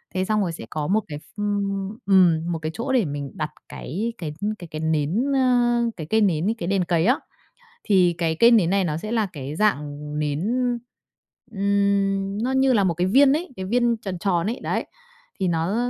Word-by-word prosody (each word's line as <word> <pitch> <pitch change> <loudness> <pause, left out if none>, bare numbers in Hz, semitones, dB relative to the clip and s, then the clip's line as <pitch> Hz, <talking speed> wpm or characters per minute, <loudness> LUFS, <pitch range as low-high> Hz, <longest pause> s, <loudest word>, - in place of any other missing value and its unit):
Thế 185 0 0
xong 215 +1 +1
rồi 180 -4 -1
sẽ 160 - -8
có 150 -1 -3
một 210 +4 +2
cái 150 -3 -6
ph 195 - -18 0.7
ừm, 175 -4 +4
một 165 - -2
cái 155 0 -4
chỗ 245 +4 -3
để 235 -8 +3
mình 145 -1 -5
đặt 155 -1 -3 0.2
cái 215 - -4
cái 155 -4 -5 0.3
cái 175 - -9
cái 155 -1 -5
nến, 160 - 0
ơ, 245 -2 +3 0.2
cái 155 -3 -6
cây 220 0 +3
nến, 180 -4 +2
cái 170 - -4
đèn 195 -1 +1
cày 170 0 +1
á. 250 +5 +3 0.7
Thì 180 -4 +3
cái 165 -2 0
cây 235 +5 +6
nến 210 -8 +4
này 195 0 +2
nó 155 -3 -1
sẽ 215 +7 -5
là 220 -3 +1
cái 145 -1 -6
dạng 150 -9 +1 0.3
nến, 150 -1 -1 1.1
ừm, 200 0 0
nó 255 - 0
như 265 0 +3
là 210 -5 +3
một 175 -3 +1
cái 175 +3 0
viên 270 +7 +5
ấy, 325 +5 -1
cái 190 - -5
viên 240 +2 +2
tròn 190 -5 -6
tròn 175 -2 0
ấy, 230 +4 -3
đấy, - - -2 0.5
thì 185 - +1
nó, 170 +4 0
190 Hz, 210 wpm, -23 LUFS, 160-220 Hz, 1.1 s, cây